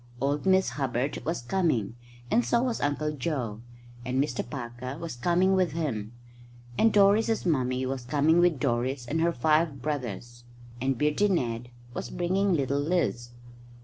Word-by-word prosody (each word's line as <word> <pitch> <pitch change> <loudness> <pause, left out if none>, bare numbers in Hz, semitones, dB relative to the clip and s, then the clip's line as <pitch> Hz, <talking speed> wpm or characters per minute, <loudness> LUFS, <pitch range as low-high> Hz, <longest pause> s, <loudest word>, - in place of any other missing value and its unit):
Old 140 +6 -1
Miss 190 0 +4
Hubbard 130 +1 -2
was 165 -6 -2
coming, 120 - 0 0.4
and 240 - +4
so 235 0 +2
was 250 -3 -1
Uncle 145 +1 0
Joe, 125 -7 -3 0.4
and 125 +2 -1
Mr 135 -3 0
Parker 125 +1 -6
was 165 -4 -6
coming 180 +8 +2
with 185 -5 +2
him; 120 -10 -3 0.6
and 225 - +4
Doris's 210 +2 +3
mummy 130 -5 +1
was 130 -1 -3
coming 150 +6 +3
with 175 -5 +3
Doris 125 0 -1
and 160 +6 -1
her 170 +1 +3
five 155 +1 +1
brothers; 120 -4 -5 0.4
and 135 -1 0
Beardy 150 - +2
Ned 120 - -1 0.2
was - - -5
bringing 190 +3 0
little 140 -3 0
Liz. 145 -6 0
145 Hz, 150 wpm, -28 LUFS, 125-170 Hz, 0.6 s, Miss